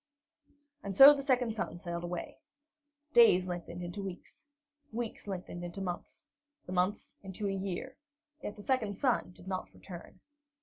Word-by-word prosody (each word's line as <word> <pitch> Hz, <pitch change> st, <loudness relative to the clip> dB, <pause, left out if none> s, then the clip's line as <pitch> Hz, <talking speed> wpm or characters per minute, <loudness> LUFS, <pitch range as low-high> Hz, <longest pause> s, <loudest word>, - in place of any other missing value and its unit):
And 195 Hz, -1 st, -5 dB
so 275 Hz, +2 st, +12 dB
the 285 Hz, -, -3 dB
second 250 Hz, -4 st, +2 dB
son 215 Hz, -5 st, -3 dB
sailed 170 Hz, -1 st, -5 dB
away. 175 Hz, 0 st, -5 dB, 0.7 s
Days 185 Hz, -6 st, +7 dB
lengthened 175 Hz, -1 st, -5 dB
into 175 Hz, +4 st, -5 dB
weeks, 195 Hz, -, -9 dB, 0.4 s
weeks 230 Hz, -2 st, -4 dB
lengthened 180 Hz, -2 st, -5 dB
into 175 Hz, +2 st, -6 dB
months, 180 Hz, -2 st, -6 dB, 0.4 s
the -, -, -8 dB
months 185 Hz, +3 st, 0 dB
into 195 Hz, +1 st, -4 dB
a -, -, 0 dB
year, 195 Hz, +7 st, -4 dB, 0.5 s
yet 205 Hz, -, -5 dB
the 205 Hz, -, -11 dB
second 220 Hz, -6 st, 0 dB
son 255 Hz, -8 st, +1 dB
did 180 Hz, 0 st, -15 dB
not 185 Hz, -1 st, -3 dB
return. 180 Hz, 0 st, -11 dB
195 Hz, 155 wpm, -32 LUFS, 175-220 Hz, 0.7 s, so